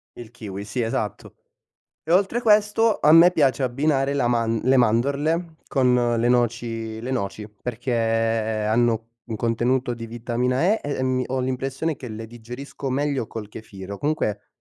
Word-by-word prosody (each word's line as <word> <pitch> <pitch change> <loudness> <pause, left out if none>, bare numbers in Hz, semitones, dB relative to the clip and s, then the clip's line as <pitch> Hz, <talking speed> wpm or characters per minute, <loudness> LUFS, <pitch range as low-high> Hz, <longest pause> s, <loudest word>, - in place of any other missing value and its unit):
Il 120 -2 -10
kiwi, 100 -4 -7
sì 110 +4 -3
esatto. 110 -3 -3 0.7
E 160 - -1
oltre 195 +5 +3
a - - -4
questo 215 0 +3
a 150 - +5
me 165 +2 +8
piace 140 -5 +2
abbinare 135 +2 +1
la 135 -4 +1
man 115 -2 +1
le 130 +2 +4
mandorle, 140 +8 +1
con 125 -3 +2
le 120 +1 +2
noci 115 -2 -1
le 125 +3 -5
noci 105 -3 -3
perché 120 +4 -5
hanno 115 0 +1 0.2
un 115 - -6
contenuto 120 +3 0
di 115 -1 -7
vitamina 120 +3 -1
E 210 +6 +3
e, 145 -2 -2
mhmm, 130 0 +1
ho 130 0 -1
l'impressione 135 +4 -2
che 125 - -8
le 110 0 -7
digerisco 125 +4 -7
meglio 140 -2 -1
col 105 -2 -7
kefir, 100 -3 -9
o 100 - -6
comunque 125 -9 -1
120 Hz, 165 wpm, -23 LUFS, 115-140 Hz, 0.7 s, me